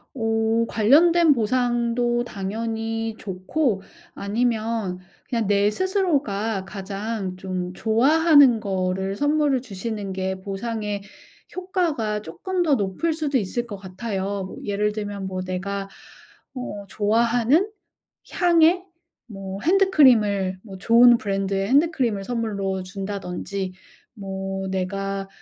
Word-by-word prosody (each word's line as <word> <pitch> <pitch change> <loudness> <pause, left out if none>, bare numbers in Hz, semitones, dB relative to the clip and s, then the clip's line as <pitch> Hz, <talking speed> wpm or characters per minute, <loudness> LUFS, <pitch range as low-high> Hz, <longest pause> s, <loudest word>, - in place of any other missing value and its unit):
어 225 -1 +1
관련된 320 +8 +5
보상도 240 0 +1
당연히 225 +1 -3
좋고 195 +4 -1 0.3
아니면 220 -3 -1 0.3
그냥 230 -4 -1
내 205 0 +3
스스로가 270 - 0
가장 195 0 -4
좀 185 -1 -4
좋아하는 275 - +5
거를 190 -1 -2
선물을 290 0 +1
주시는 205 -2 -5
게 190 0 -3
보상의 205 +1 -4 0.5
효과가 330 - -1
쪼끔 360 - -3
더 310 -5 +3
높을 210 - -1
수도 295 -4 0
있을 235 +4 -3
것 220 -4 -7
같아요. 195 0 -4
뭐 185 - -9
예를 210 +1 0
들면 205 -2 -5
뭐 185 -1 -4
내가 195 +2 -4 0.6
어 230 -6 -6
좋아하는 235 - +2 0.6
향의 345 0 +4 0.4
뭐 195 -2 -7
핸드크림을 245 - +4
뭐 195 -3 -10
좋은 235 +4 +6
브랜드의 195 -1 -1
핸드크림을 265 -8 +2
선물로 200 -5 -2
준다든지 195 0 -5 0.4
뭐 195 -1 -4
내가 195 +1 -3
215 Hz, 235 characters per minute, -23 LUFS, 195-245 Hz, 0.6 s, 좋은